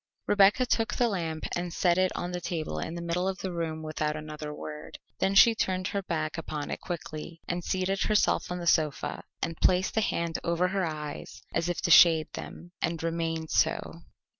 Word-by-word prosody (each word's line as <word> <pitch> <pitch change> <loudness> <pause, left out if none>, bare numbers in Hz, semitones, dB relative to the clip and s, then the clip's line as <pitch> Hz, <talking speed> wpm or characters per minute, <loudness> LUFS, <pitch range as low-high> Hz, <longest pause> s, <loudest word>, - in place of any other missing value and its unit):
Rebecca 205 +5 +5
took 230 -1 0
the 245 - +3
lamp 165 -7 -3
and 175 0 -3
set 175 +1 +2
it 185 0 +3
on 175 - -3
the 180 0 -4
table 160 - -3
in 165 - -4
the 170 - -5
middle 175 +2 -1
of 190 -1 -2
the 190 - -4
room 160 -2 -3
without 155 -1 -2
another 150 0 -6
word. 150 0 -8 0.2
Then 195 +1 +1
she 230 +4 +8
turned 185 -4 -1
her 200 - -1
back 160 -3 -2
upon 150 -2 -5
it - - -4
quickly 165 -1 -6
and 175 0 -2
seated 190 +2 -1
herself 210 -3 +2
on 180 - -2
the 175 - -5
sofa, 155 -4 +1 0.2
and 165 -1 -3
placed 185 +1 +3
a - - +5
hand 170 -5 -1
over 170 +2 +1
her 190 -2 0
eyes 150 -2 -6
as 170 +1 0
if 175 - -2
to 170 - +1
shade 165 -2 +7
them, 175 - -8
and 165 -1 -1
remained 165 -1 -2
so. - - 0
170 Hz, 200 wpm, -28 LUFS, 160-185 Hz, 0.2 s, she